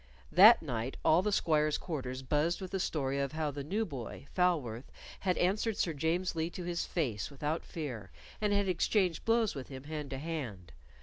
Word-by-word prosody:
That 210 Hz, +4 st, +8 dB
night 125 Hz, -3 st, -3 dB
all 160 Hz, +3 st, +6 dB
the 210 Hz, +2 st, 0 dB
squires' 155 Hz, -5 st, +2 dB
quarters 130 Hz, -6 st, -4 dB
buzzed 150 Hz, +5 st, +1 dB
with 190 Hz, -2 st, -6 dB
the 195 Hz, -, -1 dB
story 140 Hz, -5 st, -1 dB
of 140 Hz, +1 st, -1 dB
how 155 Hz, -2 st, -1 dB
the 140 Hz, 0 st, -5 dB
new 205 Hz, +10 st, -1 dB
boy, 135 Hz, -, -7 dB
Falworth, 145 Hz, -10 st, 0 dB, 0.3 s
had 185 Hz, -2 st, 0 dB
answered 205 Hz, +4 st, +1 dB
Sir 165 Hz, -, 0 dB
James 165 Hz, +5 st, 0 dB
Lee 160 Hz, +1 st, -1 dB
to 180 Hz, -, -7 dB
his 175 Hz, 0 st, -2 dB
face 120 Hz, -, -2 dB
without 150 Hz, +3 st, -3 dB
fear, 125 Hz, -, -6 dB, 0.3 s
and 210 Hz, -1 st, +1 dB
had 200 Hz, -1 st, +2 dB
exchanged 180 Hz, -1 st, +1 dB
blows 225 Hz, -2 st, +3 dB
with 135 Hz, -3 st, -7 dB
him 130 Hz, -1 st, -8 dB
hand 150 Hz, -1 st, -5 dB
to 135 Hz, -, -4 dB
hand. 130 Hz, -, -5 dB
155 Hz, 190 wpm, -32 LUFS, 135-180 Hz, 0.3 s, That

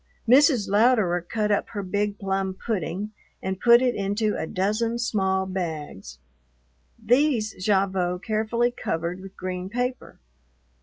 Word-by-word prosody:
Mrs. 260 Hz, -3 st, +5 dB
Louderer 205 Hz, -4 st, +3 dB
cut 210 Hz, +4 st, -2 dB
up 205 Hz, -, 0 dB
her 205 Hz, -3 st, -5 dB
big 205 Hz, +2 st, -1 dB
plum 195 Hz, -1 st, -2 dB
pudding 195 Hz, 0 st, -3 dB, 0.3 s
and 190 Hz, 0 st, -4 dB
put 235 Hz, +3 st, +6 dB
it 250 Hz, -1 st, +2 dB
into 205 Hz, +2 st, -1 dB
a -, -, -3 dB
dozen 215 Hz, +6 st, 0 dB
small 190 Hz, -5 st, 0 dB
bags. 155 Hz, -, -5 dB, 0.8 s
These 245 Hz, -3 st, +2 dB
Gavotte 190 Hz, -3 st, +1 dB
carefully 225 Hz, +2 st, 0 dB
covered 170 Hz, -5 st, -3 dB
with 195 Hz, 0 st, -12 dB
green 185 Hz, 0 st, -4 dB
paper. 250 Hz, +3 st, -3 dB
205 Hz, 125 wpm, -25 LUFS, 185-230 Hz, 0.8 s, put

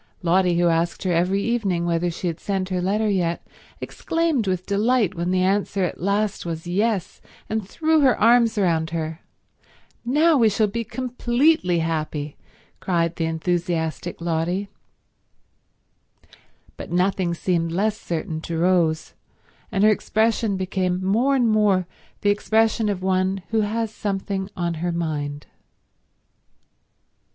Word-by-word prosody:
Lotty, 180 Hz, 0 st, +3 dB
who 175 Hz, -, +3 dB
asked 165 Hz, +2 st, 0 dB
her 185 Hz, -, 0 dB
every 180 Hz, +4 st, +1 dB
evening 200 Hz, -8 st, 0 dB
whether 170 Hz, +1 st, 0 dB
she 170 Hz, +2 st, -6 dB
had 170 Hz, -1 st, -2 dB
sent 190 Hz, -2 st, -2 dB
her 185 Hz, -1 st, -1 dB
letter 210 Hz, +4 st, 0 dB
yet, 175 Hz, -4 st, -1 dB, 0.3 s
exclaimed 325 Hz, -9 st, -1 dB
with 185 Hz, -1 st, -1 dB
delight 210 Hz, 0 st, +1 dB
when 175 Hz, 0 st, -3 dB
the 185 Hz, 0 st, +2 dB
answer 195 Hz, 0 st, +1 dB
at 180 Hz, -, -3 dB
last 200 Hz, +2 st, 0 dB
was 165 Hz, -1 st, -5 dB
yes, 195 Hz, +1 st, -1 dB, 0.3 s
and 215 Hz, -3 st, -3 dB
threw 315 Hz, +4 st, +2 dB
her 265 Hz, -6 st, +3 dB
arms 230 Hz, 0 st, +4 dB
round 165 Hz, -5 st, +1 dB
her. 160 Hz, 0 st, -4 dB, 0.8 s
"Now 300 Hz, +6 st, +3 dB
we 230 Hz, -4 st, +5 dB
shall 215 Hz, +1 st, +2 dB
be 230 Hz, +3 st, -3 dB
completely 245 Hz, -, +1 dB
happy!" 155 Hz, -2 st, -3 dB, 0.4 s
cried 170 Hz, -2 st, 0 dB
the 165 Hz, -, 0 dB
enthusiastic 165 Hz, 0 st, -2 dB
Lotty. 170 Hz, +4 st, -1 dB, 2.1 s
But -, -, -8 dB
nothing 180 Hz, -1 st, +1 dB
seemed 165 Hz, -2 st, -1 dB
less 205 Hz, +5 st, 0 dB
certain 160 Hz, -5 st, -4 dB
to 165 Hz, 0 st, -4 dB
Rose, 165 Hz, -2 st, +1 dB, 0.6 s
and 200 Hz, -2 st, +1 dB
her 215 Hz, -, +6 dB
expression 220 Hz, -1 st, +1 dB
became 185 Hz, -1 st, -1 dB
more 240 Hz, +8 st, +2 dB
and 245 Hz, -3 st, +3 dB
more 210 Hz, -4 st, +3 dB, 0.4 s
the 205 Hz, -, +3 dB
expression 220 Hz, +1 st, +1 dB
of 190 Hz, -2 st, -3 dB
one 190 Hz, 0 st, 0 dB
who 225 Hz, -1 st, +2 dB
has 220 Hz, +1 st, -2 dB
something 195 Hz, -1 st, -3 dB
on 170 Hz, -1 st, -1 dB
her 175 Hz, 0 st, 0 dB
mind. 150 Hz, -4 st, -3 dB
190 Hz, 140 wpm, -23 LUFS, 170-215 Hz, 2.1 s, her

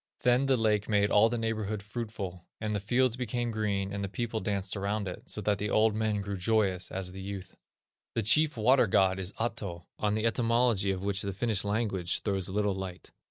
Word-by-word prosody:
Then 125 Hz, +2 st, +3 dB
the 135 Hz, -1 st, +3 dB
lake 105 Hz, -2 st, +1 dB
made 105 Hz, -1 st, +3 dB
all 110 Hz, +2 st, +6 dB
the 120 Hz, -, -1 dB
neighborhood 110 Hz, -2 st, -2 dB
fruitful, 105 Hz, -5 st, -6 dB
and 105 Hz, -1 st, -2 dB
the -, -, 0 dB
fields 120 Hz, +4 st, +2 dB
became 120 Hz, -1 st, -2 dB
green, 100 Hz, -3 st, -1 dB
and 100 Hz, 0 st, -3 dB
the 100 Hz, -, -3 dB
people 115 Hz, +1 st, -3 dB
danced 100 Hz, -2 st, -2 dB
around 100 Hz, +1 st, -2 dB
it, 90 Hz, -, -6 dB
so 105 Hz, -, -2 dB
that 105 Hz, -1 st, +1 dB
the 105 Hz, -, -2 dB
old 110 Hz, +1 st, +3 dB
men 110 Hz, -1 st, 0 dB
grew 100 Hz, 0 st, -4 dB
joyous 95 Hz, -2 st, +1 dB
as 95 Hz, -1 st, -3 dB
the 95 Hz, +1 st, -8 dB
youth." 95 Hz, -1 st, -7 dB, 0.6 s
The 115 Hz, -, +1 dB
chief 150 Hz, +6 st, +5 dB
water 125 Hz, +2 st, +4 dB
god 95 Hz, 0 st, +3 dB
is 95 Hz, 0 st, -3 dB
Ahto, 100 Hz, -7 st, -4 dB
on 105 Hz, 0 st, +1 dB
the 110 Hz, +1 st, -1 dB
etymology 115 Hz, -3 st, +2 dB
of 95 Hz, -1 st, -2 dB
which 100 Hz, -1 st, 0 dB
the 100 Hz, -1 st, -3 dB
Finnish 105 Hz, 0 st, 0 dB
language 100 Hz, -4 st, 0 dB
throws 95 Hz, -2 st, -1 dB
little 105 Hz, +1 st, +1 dB
light. 95 Hz, -2 st, -7 dB
105 Hz, 205 wpm, -30 LUFS, 95-115 Hz, 0.6 s, all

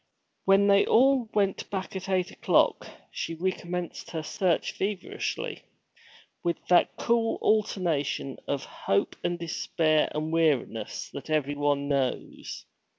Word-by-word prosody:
When 195 Hz, +1 st, +5 dB
they 200 Hz, 0 st, +6 dB
all 260 Hz, -1 st, +4 dB
went 200 Hz, -2 st, 0 dB
back 190 Hz, -1 st, -4 dB
at 190 Hz, +1 st, -5 dB
eight 185 Hz, -2 st, +1 dB
o'clock, -, -, +2 dB, 0.2 s
she 165 Hz, -, -4 dB
recommenced 180 Hz, 0 st, -3 dB
her 160 Hz, -2 st, -4 dB
search 175 Hz, +1 st, 0 dB
feverishly, 195 Hz, -1 st, -3 dB, 0.8 s
with 170 Hz, -1 st, 0 dB
that 180 Hz, -, +4 dB
cruel 230 Hz, -1 st, +1 dB
alternation 170 Hz, -10 st, 0 dB
of 140 Hz, -2 st, -2 dB
hope 100 Hz, -, -1 dB
and 175 Hz, 0 st, 0 dB
despair 160 Hz, -2 st, +1 dB
and 155 Hz, +1 st, -2 dB
weariness 145 Hz, -9 st, 0 dB
that 140 Hz, +2 st, -8 dB
everyone 145 Hz, -1 st, +1 dB
knows. 135 Hz, -3 st, -2 dB
170 Hz, 120 wpm, -28 LUFS, 145-195 Hz, 0.8 s, they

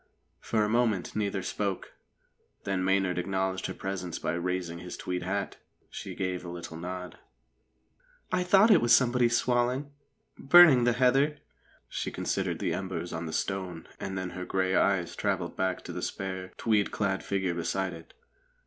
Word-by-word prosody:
For 110 Hz, -2 st, 0 dB
a -, -, +1 dB
moment 110 Hz, -4 st, +1 dB
neither 100 Hz, -3 st, -1 dB
spoke; 100 Hz, -3 st, -3 dB, 0.7 s
then 95 Hz, -2 st, -1 dB
Maynard 95 Hz, -1 st, +1 dB
acknowledged 95 Hz, +1 st, -1 dB
her -, -, -4 dB
presence 95 Hz, -3 st, -4 dB
by -, -, -2 dB
raising 85 Hz, -1 st, -2 dB
his 90 Hz, 0 st, -7 dB
tweed 90 Hz, 0 st, -3 dB
hat. 100 Hz, +2 st, -3 dB, 0.3 s
She -, -, -7 dB
gave 90 Hz, -2 st, -2 dB
a 90 Hz, -, -7 dB
little 85 Hz, -1 st, -7 dB
nod. 90 Hz, +2 st, -6 dB, 1.1 s
"I 185 Hz, 0 st, +2 dB
thought 195 Hz, +5 st, +5 dB
it 190 Hz, -, +6 dB
was 120 Hz, 0 st, +6 dB
somebody 125 Hz, -1 st, +3 dB
swaling 125 Hz, +4 st, +1 dB, 0.5 s
burning 140 Hz, -4 st, +8 dB
the 120 Hz, -, +4 dB
heather." 135 Hz, +4 st, +3 dB, 0.5 s
She -, -, -3 dB
considered -, -, -2 dB
the -, -, -1 dB
embers 90 Hz, -3 st, -4 dB
on 80 Hz, 0 st, -4 dB
the -, -, -5 dB
stone, 90 Hz, -2 st, -3 dB
and 95 Hz, -1 st, -4 dB
then 95 Hz, -1 st, -3 dB
her 90 Hz, -, -6 dB
grey 95 Hz, 0 st, 0 dB
eyes 95 Hz, -4 st, +2 dB
travelled -, -, -1 dB
back 95 Hz, -1 st, -1 dB
to 85 Hz, -, -7 dB
the 90 Hz, -, -4 dB
spare, 95 Hz, -1 st, -4 dB
tweed 105 Hz, -3 st, +2 dB
clad 95 Hz, -2 st, -1 dB
figure 95 Hz, -3 st, -1 dB
beside 90 Hz, +2 st, -2 dB
it. 80 Hz, -1 st, -13 dB
95 Hz, 165 wpm, -29 LUFS, 90-115 Hz, 1.1 s, burning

